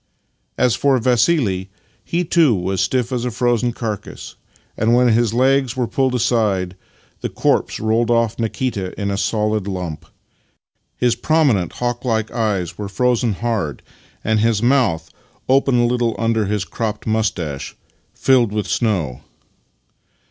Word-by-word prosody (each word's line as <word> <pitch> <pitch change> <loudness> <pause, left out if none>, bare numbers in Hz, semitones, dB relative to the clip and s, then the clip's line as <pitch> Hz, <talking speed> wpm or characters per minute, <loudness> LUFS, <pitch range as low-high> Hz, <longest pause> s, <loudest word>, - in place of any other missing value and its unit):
As 125 -2 +3
for 135 +6 +2
Vassili, 120 - +1 0.3
he 175 +1 -1
too 155 -7 +4
was 95 +1 -2
as - - +3
stiff 125 -1 -1
as 125 -2 -1
a 125 - -1
frozen 120 0 +1
carcase, 110 -4 -6 0.4
and 115 +2 +2
when 125 0 +4
his 115 -1 +2
legs 130 +1 +2
were 125 - +1
pulled 130 +1 0
aside 100 -6 +1 0.5
the - - -2
corpse - - 0
rolled 110 +2 +1
off 115 -1 +1
Nikita 110 -4 -3
in 100 -1 -1
a - - -1
solid 105 -1 0
lump. 85 -4 -5 0.9
His 120 -1 +2
prominent, 130 - +1
hawk 120 -1 -3
like 110 -3 -1
eyes 105 -7 -2
were 100 -1 -4
frozen 120 +2 +1
hard, 105 -8 -3 0.4
and 110 0 +1
his 115 0 +1
mouth 120 - +2 0.4
(open 135 -1 +3
a - - +3
little 120 -2 0
under 115 0 +1
his 105 -1 -1
cropped 110 -2 -4
moustache) 90 -10 -2 0.4
filled 125 -5 +2
with 105 -2 -2
snow. 90 - -1
115 Hz, 145 wpm, -19 LUFS, 100-125 Hz, 0.9 s, too